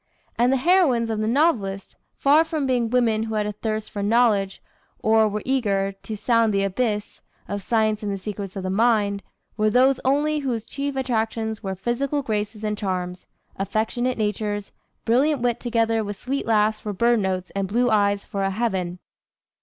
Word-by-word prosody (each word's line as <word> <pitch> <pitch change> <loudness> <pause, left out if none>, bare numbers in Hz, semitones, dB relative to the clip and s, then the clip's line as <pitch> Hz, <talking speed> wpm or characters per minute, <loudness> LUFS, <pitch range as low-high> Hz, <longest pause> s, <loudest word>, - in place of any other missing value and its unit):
And 245 +2 +3
the 270 - +3
heroines 265 -8 +3
of 220 - -2
the 215 - 0
novelist, 225 - 0 0.2
far 295 +3 +5
from 320 -3 -2
being 245 -3 +1
women 230 -3 +2
who 220 0 -3
had 210 -1 0
a 210 - -2
thirst 215 +1 -4
for 205 - -4
knowledge, 205 -2 +2 0.4
or 220 0 +3
were 210 0 -4
eager 200 -7 +1
"To 210 +2 -8
sound 230 +1 +2
the 195 -1 +1
abyss 210 +1 -2 0.3
Of 205 0 -4
science 215 -1 +1
and 205 -1 -3
the 195 - -2
secrets 200 -1 -6
of 195 - -4
the 185 - -2
mind," 205 -2 +2 0.4
were 215 0 +3
those 255 +4 +4
only 295 +3 +2
whose 240 -6 -2
chief 280 0 -4
attractions 225 -4 -1
were 190 -3 -4
physical 265 +8 -1
graces 210 -1 -3
and 210 0 -1
charms, 180 -3 -4 0.3
affectionate 220 +6 -1
natures, 210 -1 -2 0.3
brilliant 260 +3 +2
wit 240 -1 +1
together 230 -2 +1
with 205 -1 -5
"sweet 270 +5 -3
laughs 215 -1 +2
for 210 -1 -5
bird 235 +4 +3
notes 185 -2 -2
and 195 -1 -1
blue 240 +4 +1
eyes 205 -1 +2
for 200 - -4
a 195 - +1
heaven." 190 -4 -2
220 Hz, 180 wpm, -23 LUFS, 200-245 Hz, 0.4 s, far